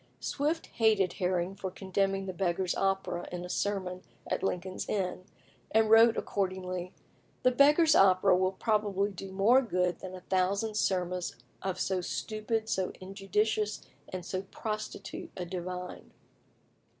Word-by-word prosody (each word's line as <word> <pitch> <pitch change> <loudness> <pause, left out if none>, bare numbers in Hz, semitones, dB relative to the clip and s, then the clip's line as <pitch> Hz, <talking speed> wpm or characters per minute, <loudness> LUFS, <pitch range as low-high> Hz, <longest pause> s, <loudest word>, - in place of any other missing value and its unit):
Swift 300 +4 -1
hated 215 -5 +2
Herring 180 0 0
for 195 -1 -5
condemning 195 +1 -1
the 185 - -4
"Beggars' 180 0 0
Opera" 190 -2 -1
in 180 0 -4
a - - -8
sermon 185 -2 -2 0.2
at - - -2
Lincoln's 185 0 -3
Inn, 185 -2 -2 0.4
and 220 0 +3
wrote 225 +1 +7
accordingly: 185 -2 -2 0.5
"The 255 - +5
'Beggars' 295 +5 +6
Opera' 190 0 +6
will 185 +1 +2
probably 205 -1 +1
do 195 0 -8
more 215 +7 +5
good 180 -7 0
than 185 0 -7
a 185 - -9
thousand 195 +4 0
sermons 180 -3 0 0.3
of 185 -1 -3
so 190 -1 0
stupid, 215 +4 -2
so 190 -4 0
injudicious, 210 +2 -1 0.3
and 185 -2 -5
so 185 0 -2
prostitute 215 -2 -5
a 180 - -3
divine." 180 0 -6
190 Hz, 140 wpm, -30 LUFS, 185-210 Hz, 0.5 s, wrote